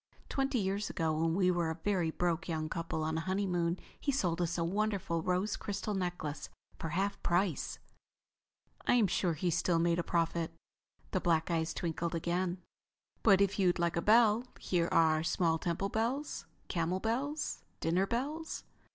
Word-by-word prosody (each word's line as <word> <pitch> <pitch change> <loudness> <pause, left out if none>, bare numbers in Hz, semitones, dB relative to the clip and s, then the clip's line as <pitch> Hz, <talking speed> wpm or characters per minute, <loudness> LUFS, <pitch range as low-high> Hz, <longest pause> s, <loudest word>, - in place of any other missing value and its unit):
Twenty 270 -1 0
years 200 0 -1
ago 160 -2 0
when 165 +1 +1
we 185 -1 +4
were 175 -2 0
a 160 - -2
very 180 -1 0
broke 175 +2 -1
young 155 -1 -2
couple 165 -1 -2
on 160 +1 0
a - - -2
honeymoon 180 -2 0 0.2
he 285 - 0
sold 180 -10 0
us 175 0 0
a 170 - +1
wonderful 195 -2 0
rose 185 +4 0
crystal 205 0 -3
necklace 175 -6 -3 0.3
for 165 - -3
half 195 +5 -1
price." 175 -2 0 1.1
"I'm 245 -3 +5
sure 180 -2 +1
he 175 +3 0
still 170 +1 +2
made 170 +1 +2
a - - +1
profit." 165 -1 0 0.6
The 185 - +1
black 165 0 +2
eyes 160 -1 0
twinkled 170 0 -2
again. 175 +2 -1 0.6
"But 200 -3 +6
if 200 0 +2
you'd 180 -2 +3
like 170 -1 +1
a 170 - +1
bell, 220 +2 +5 0.2
here 175 -2 0
are 155 -1 +4
small 165 -1 +1
temple 175 +4 -1
bells, 240 +8 -2 0.2
camel 175 +1 0
bells, 270 +8 -2 0.2
dinner 180 +4 +1
bells...." 295 +8 -3
175 Hz, 165 wpm, -33 LUFS, 165-200 Hz, 1.1 s, But